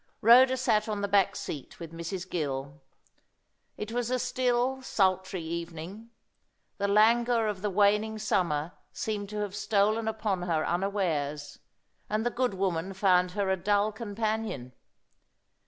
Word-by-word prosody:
Rhoda 255 +4 +7
sat 215 -4 +1
on 210 -1 -2
the 200 - 0
back 200 -1 +3
seat 140 -4 -7
with 165 -2 -8
Mrs. 175 +2 -5
Gill. 140 -4 -4 1.0
It 210 +1 -5
was 240 0 -1
a 255 - +1
still, 250 +1 0
sultry 190 -6 0
evening. 170 +6 -6 0.7
The 200 - +1
languor 230 +3 +4
of 205 -3 -3
the 210 - -1
waning 210 +2 +2
summer 175 -7 0 0.2
seemed 205 -2 -4
to 210 0 -4
have 205 -1 -4
stolen 215 +2 +1
upon 215 -4 -1
her 165 -3 0
unawares, 160 -7 -2 0.5
and 215 +2 -1
the 240 - +1
good 245 -4 -1
woman 185 -1 -1
found 180 -2 +3
her 200 -1 0
a - - +3
dull 205 +3 +1
companion. 215 - -3
200 Hz, 140 wpm, -28 LUFS, 175-220 Hz, 1.0 s, Rhoda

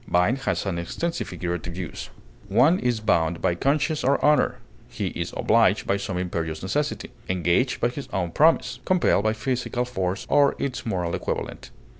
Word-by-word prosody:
Bind 90 +9 +2
has 135 - -1
an 90 -3 -2
extensive 165 - -3
figurative 85 -1 -4
use. 90 -2 -6 0.4
One 160 +8 +4
is 120 -2 0
bound 85 -5 +1
by - - +1
conscience 145 - 0
or 140 +2 +3
honor; 150 0 +3 0.3
he - - -3
is - - -4
obliged - - +3
by 100 - +1
some 100 -2 -4
imperious 85 -3 -3
necessity; 145 +10 -2 0.2
engaged 90 +7 +1
by 120 - +2
his 135 +3 -7
own 90 -3 -1
promise; 160 - +3
compelled 180 - +2
by 110 - +3
physical 125 +2 -2
force 95 -6 -2
or 145 -1 +4
its 130 -3 -3
moral 90 -5 -1
equivalent. - - -4
110 Hz, 165 wpm, -25 LUFS, 90-140 Hz, 0.4 s, One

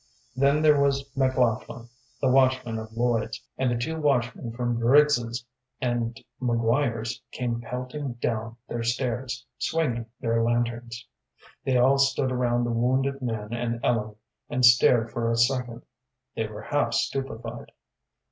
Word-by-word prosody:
Then 140 +3 +3
there 150 -2 +5
was 140 0 +1
McLaughlin, 125 -3 0 0.3
the 135 - +1
watchman 130 -3 +2
of 110 0 -8
Lloyd's, 120 -2 0 0.2
and 130 -1 +2
the 120 - 0
two 160 +7 -3
watchmen 125 -4 0
from 120 0 -2
Briggs's 120 -2 +3 0.3
and 120 -1 -1 0.2
McGuire's 115 -1 0
came 120 -2 -2
pelting 125 +3 -5
down 115 -1 -3
their 120 - -3
stairs, 125 +1 -2
swinging 125 -9 -1
their 115 -1 +1
lanterns. 120 0 -1 0.6
They 130 -2 +2
all 135 +3 +4
stood 140 -1 +2
around 120 -1 +1
the 120 - -1
wounded 130 +4 +1
man 110 -3 -3
and 120 0 -2
Ellen, 110 -3 0 0.3
and 125 0 +3
stared 120 -1 +5
for 115 -1 -1
a 115 - +1
second. 120 -1 0 0.5
They 110 -1 -1
were 105 0 -9
half 145 0 0
stupefied. 120 -3 -3
120 Hz, 140 wpm, -26 LUFS, 115-130 Hz, 0.6 s, there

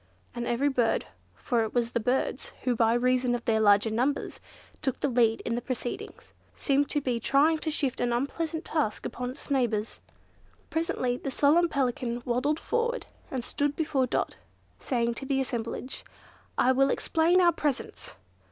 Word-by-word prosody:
and 240 0 -4
every 240 +4 +1
bird—for 245 -1 -1
it 220 +1 -3
was 235 -1 +1
the 235 - 0
birds 250 +4 -1
who 250 -2 +1
by 225 0 +3
reason 250 +1 +2
of 240 - -6
their 225 -3 +2
larger 205 +1 +4
numbers 255 +6 -1 0.4
took 265 - -1
the - - +1
lead 230 -3 +2
in 235 - -2
the 240 - -1
proceedings—seemed 270 +3 -3
to 295 - +1
be 250 -4 -1
trying 295 +6 +3
to 315 - -2
shift 285 -4 0
an 245 - +1
unpleasant 315 +6 -2
task 295 -10 -1
upon 250 0 -4
its 280 +3 -9
neighbours. 230 -5 0 0.7
Presently 260 -6 0
the 275 - -4
solemn 305 +6 +4
Pelican 245 -4 -1
waddled 265 +5 +1
forward 475 +1 -1 0.2
and 255 -3 -3
stood 290 +3 -1
before 280 -5 +1
Dot, - - -1 0.4
saying 235 -2 0
to 270 - -7
the 270 -1 +1
assemblage, 250 0 -3 0.5
"I 255 - +4
will 270 +1 +3
explain 330 +6 +3
our 350 -1 +6
presence." 290 -4 -3
255 Hz, 160 wpm, -28 LUFS, 235-285 Hz, 0.7 s, our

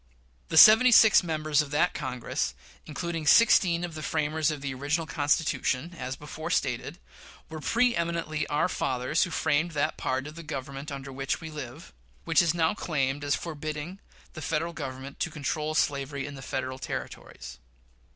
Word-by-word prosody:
The - - 0
seventy 220 +8 +9
six 220 -2 +7
members 155 -3 +1
of 150 - -6
that 150 +5 +1
Congress, 130 -5 -3 0.3
including 165 +1 -4
sixteen 180 -6 +5
of 175 -2 -4
the 155 - -7
framers 155 0 0
of 150 -2 -4
the 140 -1 -3
original 145 +5 -1
Constitution, 145 +1 0
as 130 -3 -5
before 150 +2 -7
stated, - - -1 0.5
were 160 0 -7
pre 240 +9 +2
eminently 170 -2 -2
our 145 - +1
fathers 130 +5 -1
who - - -7
framed 160 0 0
that 145 - -1
part 130 +1 -2
of 150 - -8
"the 165 - -9
Government 140 -1 -6
under 135 -1 -7
which 135 0 -2
we 160 -1 -8
live," 150 0 -9 0.3
which - - +4
is 170 -1 +1
now 165 +1 +2
claimed 145 -7 -2
as 145 0 +1
forbidding 155 +2 -6 0.3
the 155 - -8
Federal 165 +2 -2
Government 130 -1 -7
to - - -1
control 155 0 -3
slavery 140 -2 -1
in 145 - -7
the 135 - -9
Federal 130 0 -4
Territories. - - -7
150 Hz, 170 wpm, -27 LUFS, 140-165 Hz, 0.5 s, seventy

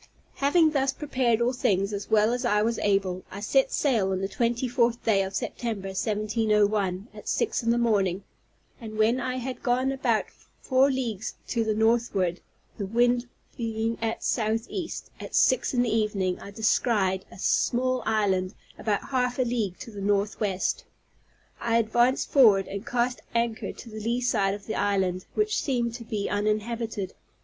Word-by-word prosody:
Having 310 +3 +4
thus 275 -2 +1
prepared 255 -5 0
all 245 +2 +2
things 200 -4 +1
as 200 0 -5
well 215 +1 +4
as 245 +1 -2
I 210 -3 +2
was 230 0 0
able, 195 -3 +1
I 200 - -7
set 265 +6 +2
sail 225 -10 +1
on 190 - 0
the 195 - -1
twenty 235 +5 0
fourth 235 -1 +1
day 205 -3 +3
of 190 0 -4
September, 200 -1 -3
1701, 210 -1 0
at - - -12
six 460 - 0
in 230 - -1
the 235 - +3
morning; 200 -5 +1 0.6
and 215 -1 -7
when 225 +4 +3
I 255 0 -2
had 255 0 -5
gone 255 +1 +1
about 250 -5 +1 0.3
four 265 +1 +3
leagues 240 -5 -3
to 230 -2 +1
the 215 -1 0
northward, 220 -6 +1 0.4
the 200 - -2
wind 240 +3 +2 0.3
being 225 -1 -2
at 225 0 -2
southeast, 225 - -2
at - - -6
six 255 - +3
in 245 -2 +2
the 225 -2 0
evening 200 -4 0
I - - -9
descried 200 -3 +1
a - - -12
small 255 +5 +1
island 195 -3 0 0.2
about 210 +1 -1
half 250 -2 0
a 255 - +3
league 230 -7 -2
to 230 - -8
the 205 -2 -8
northwest. 200 -1 0 0.8
I 230 -1 +1
advanced 240 +3 +2
forward, 215 -9 +6
and 200 +1 -5
cast 245 +1 0
anchor 230 -1 0
on - - -5 0.2
the 215 - -6
lee 235 +3 -1
side 200 -5 +1
of 205 -1 -11
the 220 - -3
island, 190 -3 0
which 425 0 +1
seemed 240 -4 -1
to 235 0 -7
be 215 -3 -3
uninhabited. 215 0 -2
225 Hz, 170 wpm, -26 LUFS, 200-245 Hz, 0.8 s, forward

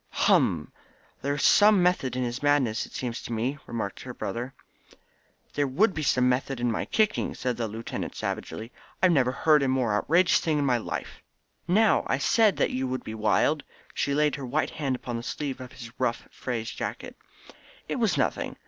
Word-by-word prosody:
"Hum! 80 -3 +3 0.5
There 140 +1 -1
was 145 - -2
some 205 -3 +6
method 155 -9 +1
in 130 - -1
his 120 +1 -3
madness, 145 -6 +2
it - - -20
seems 120 -2 -4
to - - -8
me," 125 +6 -2
remarked 110 -4 -4
her 125 -1 -8
brother. 125 +3 -4 1.0
"There 145 -1 +1
would 195 +11 +3
have - - -15
been 155 - -2
some 125 -2 +3
method 130 +1 0
in 120 -1 +1
my 110 - -2
kicking," 215 -1 0
said 125 -1 -2
the 115 -1 -2
lieutenant 110 +2 -5
savagely. 110 +9 -5 0.3
"I 185 - +7
never 135 -7 +3
heard 150 +3 +3
of 135 - +1
a - - +1
more 130 -5 +1
outrageous 170 - +3
thing 155 -2 0
in 145 - +1
my 125 -3 +2
life." - - -6 0.5
"Now, 215 +5 +4
I 135 - +1
said 210 - +3
that - - +1
you 130 +1 -1
would 130 0 -3
be 110 - -6
wild!" 110 +8 +2 0.3
She 140 - 0
laid 150 0 +2
her 135 - -6
white 140 +2 0
hand 140 -4 -2
upon 120 -1 -5
the - - -4
sleeve 135 +1 -4
of 125 - -9
his 115 -1 -10
rough 125 -2 -1
frieze 115 -3 -4
jacket. - - -5 0.7
"It - - -2
was - - +1
nothing. - - -1
130 Hz, 200 wpm, -27 LUFS, 120-150 Hz, 1.0 s, I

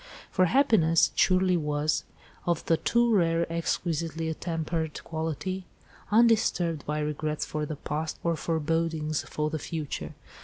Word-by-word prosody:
For 185 - +4
happiness, 185 - +4
it - - -4
surely 185 0 +4
was, 150 -1 0 0.4
of 170 -2 0
the 165 - +3
too 235 +7 +2
rare, 170 -3 +3
exquisitely 165 -1 -1
attempered 160 -1 -3
quality, 160 +3 -3 0.4
undisturbed 210 -8 +3
by 150 +1 -1
regrets 150 0 -2
for 150 -1 -3
the 155 - -4
past, 155 +2 -3
or 170 -1 +1
forebodings 160 -1 -1
for 150 0 -1
the 155 - -2
future. 155 -1 -5
165 Hz, 130 wpm, -28 LUFS, 155-175 Hz, 0.4 s, For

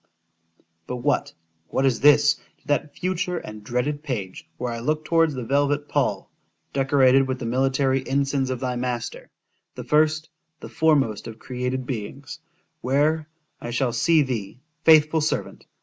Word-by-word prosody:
_ - - -48 0.8
——But 125 - -3
what——what 85 - -2
is 130 -4 +2
this, 145 +1 +6 0.3
to - - -36
that 145 0 -1
future 180 0 -1
and 105 -8 -8
dreaded 125 +6 -2
page, 100 - -5
where 125 -1 -3
I 115 - -5
look 155 +5 -1
towards 165 -3 +2
the 125 - -4
velvet 145 +3 +1
pall, 130 -9 -1 0.4
decorated 135 -1 +4
with 130 0 -2
the 125 - -6
military 135 +2 +1
ensigns 140 -1 0
of 130 -2 -2
thy 125 -1 -2
master—the 120 -1 -7
first—the 155 +1 -1
foremost 140 -10 +1
of 110 -1 -8
created 125 0 -4
beings;——where, 140 +5 -3 0.3
I 120 - -5
shall 120 0 0
see 160 +5 +3
thee, 115 -4 -4 0.2
faithful 155 0 +5
servant! 155 - -3
135 Hz, 140 wpm, -24 LUFS, 125-150 Hz, 0.8 s, this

